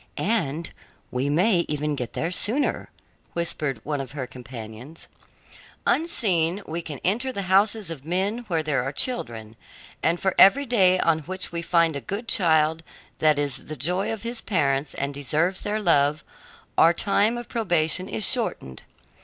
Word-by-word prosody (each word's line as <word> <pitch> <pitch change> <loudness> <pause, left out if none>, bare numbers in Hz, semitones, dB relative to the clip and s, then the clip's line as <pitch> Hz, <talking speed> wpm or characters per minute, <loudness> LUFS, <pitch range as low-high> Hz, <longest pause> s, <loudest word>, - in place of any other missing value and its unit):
"And 170 -7 -1 0.4
we 130 +3 -1
may 175 +4 +3
even 150 0 -1
get 125 -4 -5
there 165 - -2
sooner," 235 +10 0 0.4
whispered 155 -7 -2
one 145 -2 -2
of 135 0 -9
her 140 -3 -4
companions. 125 +3 -10 0.8
"Unseen 195 - +1
we 165 +2 -4
can 150 -5 -7
enter 240 +8 +1
the 200 -5 -4
houses 195 0 +2
of 145 -5 -7
men 190 +8 -1
where 165 -4 0
there 150 -4 0
are 135 +2 -3
children, 115 - -2 0.5
and 170 +2 +1
for 190 - 0
every 275 +9 +7
day 190 -7 +4
on 165 -1 +2
which 185 +4 -3
we 170 0 -3
find 170 -2 +2
a 140 - -3
good 210 - -5
child 160 -4 +3 0.4
that 155 -2 +4
is 145 -3 -1
the 155 - -6
joy 180 +4 -1
of 220 -2 -5
his 235 0 -4
parents 140 -6 0
and 140 +1 -3
deserves 155 +6 -1
their 210 +1 -2
love, 150 -6 +2 0.6
our 165 +1 +6
time 210 +5 +2
of 240 - -7
probation 185 -4 0
is 215 - -1
shortened. 220 - -2
165 Hz, 160 wpm, -24 LUFS, 145-200 Hz, 0.8 s, every